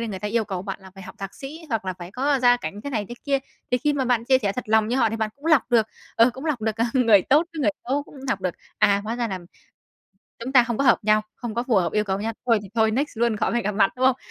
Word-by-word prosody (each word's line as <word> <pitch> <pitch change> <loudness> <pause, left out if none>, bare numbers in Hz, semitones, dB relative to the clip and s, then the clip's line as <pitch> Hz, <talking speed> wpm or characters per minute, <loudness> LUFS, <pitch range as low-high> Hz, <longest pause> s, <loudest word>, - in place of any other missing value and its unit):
đi, 230 - -2
người 195 -3 -5
ta 210 - -3
yêu 225 +1 +1
cầu 190 -3 -4
bạn 195 0 -6
là 190 - -13
phải 195 - -11
học - - -10
thạc 195 0 -6
sĩ 290 +5 -9
hoặc 225 -5 -1
là 185 - -2
phải 175 +1 -8
có 275 +4 +1
gia 245 0 +6
cảnh 205 -4 -6
thế 285 - -4
này 215 -6 -1
thế 240 - -6
kia, 280 -1 +2 0.3
thì 250 - +2
khi 295 +4 +1
mà 270 -2 0
bạn 240 -2 +1
chia 260 +1 +4
sẻ 205 -6 -1
thật 250 - -5
lòng 220 0 +3
như 245 - 0
họ 235 -4 +3
thì 225 - -3
bạn 220 -1 -1
cũng 290 - -10
lọc 310 -7 +5
được, 225 -3 +4 0.3
ờ, 230 +2 +6
cũng 265 +4 -9
lọc 300 -7 -1
được 220 -1 -1 0.2
người 225 -7 +5
tốt 300 - +3
với 320 - -5
người 215 - +3 0.2
xấu, 280 +3 +1
cũng - - -17
lọc 200 -8 0
được. 185 -2 -2 0.2
À, 200 -2 +4
hóa 230 +2 -3
ra 235 -1 -1
là 190 -2 -3 1.1
chúng 260 - -4
ta 250 -3 +7
không 235 -2 -3
có 275 - +1
hợp 250 - +5
nhau, 215 0 +4
không 235 -3 -5
có 235 - 0
phù 230 - +2
hợp 175 -3 +1
yêu 210 0 +1
cầu 195 0 -2
nhau. 225 +2 -2
Thôi 230 -3 +4
thì 195 - -10
thôi, 220 -1 +3
next 275 +7 -1
luôn 235 -2 +2
khỏi - - 0
phải 235 0 0
gặp 210 - -1
mặt, 195 -1 +3
đúng 255 +1 +2
không? 260 -1 +4
230 Hz, 320 wpm, -24 LUFS, 210-260 Hz, 1.1 s, ta